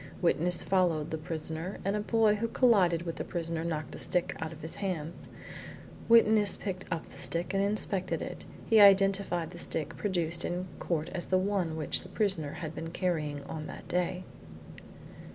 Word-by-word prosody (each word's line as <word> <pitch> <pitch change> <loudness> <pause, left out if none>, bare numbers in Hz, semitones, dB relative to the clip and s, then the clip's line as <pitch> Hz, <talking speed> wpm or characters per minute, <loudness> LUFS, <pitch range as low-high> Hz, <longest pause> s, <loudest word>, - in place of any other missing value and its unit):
Witness 175 0 +3
followed 175 -5 +1
the 160 - -2
prisoner, 160 +3 -2
and 200 +1 +1
a - - 0
boy 220 0 +3
who 230 +2 -1
collided 190 -10 +3
with 165 -1 -5
the - - -3
prisoner 165 -2 -3
knocked 160 -2 -3
the - - -8
stick 180 -1 0
out 160 0 -4
of 160 -1 -11
his 160 - -5
hands. 175 -5 -4 0.8
Witness 220 -3 +6
picked 190 -2 -5
up 165 -2 -4
the - - -12
stick 170 +3 -2
and 195 - +2
inspected 200 -2 -1
it. - - -6 0.2
He 220 -2 +5
identified 195 -4 +4
the 175 - -9
stick 160 -2 -1
produced 170 -4 0
in 180 +1 -2
court 160 -3 -2
as 180 -2 -4
the 185 - +3
one 185 -4 -1
which 155 -3 -1
the 180 - -12
prisoner 185 -7 0
had 160 -2 -6
been 165 0 -6
carrying 155 -5 -2
on 155 +2 -6
that - - -9
day. 180 +1 -1
175 Hz, 180 wpm, -30 LUFS, 160-195 Hz, 0.8 s, Witness